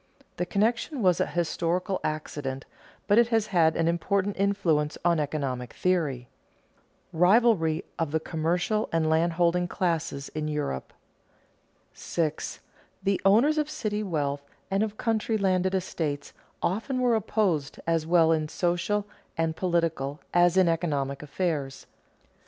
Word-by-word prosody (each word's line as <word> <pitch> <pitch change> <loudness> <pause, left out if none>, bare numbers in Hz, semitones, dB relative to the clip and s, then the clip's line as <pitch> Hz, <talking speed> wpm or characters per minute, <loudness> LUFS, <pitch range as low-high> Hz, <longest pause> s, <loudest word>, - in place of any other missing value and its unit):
The 180 - -1
connection 230 - 0
was 180 -2 +4
a - - +1
historical 175 +3 -1
accident, 145 -3 -4 0.4
but 205 +3 +4
it 235 - +5
has 225 -2 +1
had 165 -6 +3
an 165 - +1
important 195 +4 0
influence 180 -7 +1
on 170 -2 +3
economic 135 -4 -3
theory. 150 -9 0 0.8
[Sidenote: 160 - -5
Rivalry 180 -5 +4
of 165 -2 0
the 160 +2 0
commercial 175 +7 -1
and 165 -1 +1
landholding 170 +2 +2
classes 165 -6 -2
in 155 0 -4
Europe] 150 - -3 1.0
6. 155 -3 -3 0.4
_The 195 -1 +1
owners 245 +11 +4
of 300 0 -1
city 215 -7 -2
wealth 145 -7 -2 0.3
and 195 +1 +2
of 215 -1 -2
country 225 -1 0
landed 190 -1 +1
estates 155 -6 -3 0.3
often 225 +8 -1
were 250 -2 +3
opposed 195 -9 0
as 165 -1 0
well 165 -1 +5
in 155 -1 +1
social 175 +5 0 0.3
and 165 -1 0
political 165 -5 -1
as 175 +1 +4
in 185 -2 +5
economic 145 -5 -1
affairs. 150 -3 -3
170 Hz, 135 wpm, -27 LUFS, 155-200 Hz, 1.0 s, it